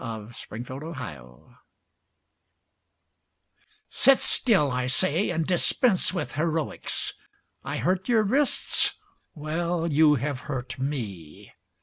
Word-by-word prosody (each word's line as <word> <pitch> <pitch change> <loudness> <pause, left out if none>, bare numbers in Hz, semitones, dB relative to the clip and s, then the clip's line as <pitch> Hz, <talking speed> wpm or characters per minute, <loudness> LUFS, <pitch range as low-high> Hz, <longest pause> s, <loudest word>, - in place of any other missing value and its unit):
A 110 -3 -6 0.2
MARRIED 115 +3 -6
COQUETTE 125 - -8 2.5
Sit 270 +1 +5
still, 185 - +2
I 125 0 -1
say, 175 +7 +1
and 165 -2 -1
dispense 185 +4 +2
with 180 -5 -3
heroics! 160 0 -1 0.5
I - - -4
hurt 185 +4 -1
your 225 -3 +4
wrists? 265 +7 +2 0.4
Well, 165 +2 -2
you 155 -1 +4
have 140 0 -2
hurt 130 -2 -4
me. 105 - -5
155 Hz, 100 wpm, -26 LUFS, 125-180 Hz, 2.5 s, Sit